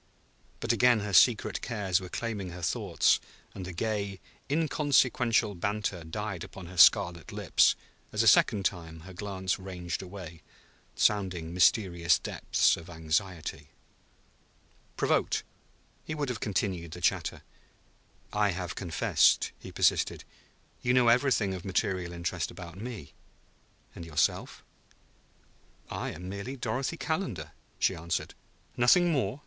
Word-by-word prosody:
But - - +1
again 125 -3 +4
her 105 -1 -4
secret 110 +5 +4
cares 100 -6 0
were 90 - -8
claiming 105 -5 -4
her 90 0 -9
thoughts, - - +2 0.3
and 95 - -7
the 90 - -6
gay, 100 +1 -2 0.3
inconsequential 130 -7 +2
banter 100 -1 -2
died 95 +2 -5
upon 95 - -10
her 90 +1 -11
scarlet 85 0 +5
lips - - +3 0.4
as - - +1
a - - +2
second 100 -2 +5
time 80 -3 -3
her 95 +3 -11
glance 95 0 -3
ranged 90 -2 -5
away, 90 -4 -9 0.5
sounding 90 -6 +1
mysterious 90 -2 +3
depths - - +1
of 85 +1 -11
anxiety. 80 -2 -3 1.3
Provoked, - - +1 0.6
he 155 - -5
would 145 -3 -2
have 125 - -3
continued 90 -5 -2
the - - -7
chatter. - - 0 0.9
"I 105 0 +2
have 90 -1 -3
confessed," 90 -4 +2
he - - -10
persisted. - - +1 0.6
"You 125 0 +2
know 125 -2 +5
everything 115 -5 +3
of 90 - -6
material 95 -2 -1
interest 85 0 -3
about 85 -3 -10
me. 105 - -8 0.8
And - - -9
yourself?" 80 -3 -1 1.3
"I - - -3
am 90 +3 -8
merely 100 +7 -5
Dorothy 135 +6 -2
Calendar," 115 - -3 0.3
she - - +2
answered. 85 0 -3 0.4
"Nothing 170 +9 +5
more?" 135 -2 -1
95 Hz, 130 wpm, -29 LUFS, 85-110 Hz, 1.3 s, scarlet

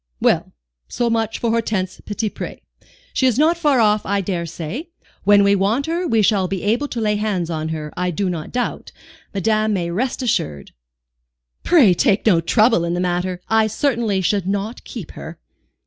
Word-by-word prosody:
"Well, - - +1 0.4
so 240 -1 -1
much 225 -1 0
for 235 - -1
Hortense 215 -5 -1
Petitpré. 210 0 -4 0.5
She 260 - +2
is 250 -2 +1
not 315 +4 +4
far 295 -6 +2
off, 210 -1 +3
I 200 - 0
dare 175 -3 -2
say. 170 - -6 0.4
When 205 0 +6
we 200 0 +4
want 205 +8 +1
her 340 +2 -1
we 225 -6 +2
shall 195 -3 +2
be 190 -1 -4
able 230 +8 +1
to 245 - -5
lay 210 -1 +1
hands 195 -5 -1
on 160 -1 -3
her, 155 -2 -5
I 180 0 -1
do 190 +3 -1
not 165 -4 -4
doubt, 245 -1 -3 0.4
madame 215 +2 +1
may 170 -3 -1
rest 255 +8 -2
assured." 75 - -2 0.9
"Pray 270 - +5
take 195 +3 +2
no 180 -7 +4
trouble 215 +2 +3
in 170 0 -1
the - - -2
matter. 180 0 -1
I 220 -1 +3
certainly 225 -4 0
should 190 +1 0
not 200 +4 -3
keep - - -8
her." - - -9
205 Hz, 180 wpm, -20 LUFS, 180-230 Hz, 0.9 s, When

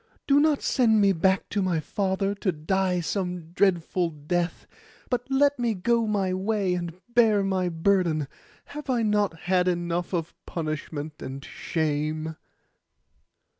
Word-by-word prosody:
Do 280 0 +5
not 300 -1 +2
send 225 -4 +3
me 200 -1 +5
back 190 +3 +2
to 205 - 0
my 180 -4 +1
father 195 +4 -1
to 200 -1 -1
die 180 +3 0
some 180 -2 -3
dreadful 175 -2 +1
death; 170 +3 -2 0.5
but 245 +1 -1
let 280 0 +3
me 235 -3 +1
go 230 +4 +1
my 195 -3 0
way, 195 0 0
and 175 0 -4
bear 220 -4 +4
my 190 -2 0
burden. 165 -3 +1 0.5
Have 295 -1 -7
I 240 -3 +2
not 205 -6 +1
had 180 0 +2
enough 175 0 -1
of 170 -3 -2
punishment 155 -1 -4
and 135 +1 -6
shame? 155 0 -2
185 Hz, 140 wpm, -26 LUFS, 165-210 Hz, 0.5 s, Do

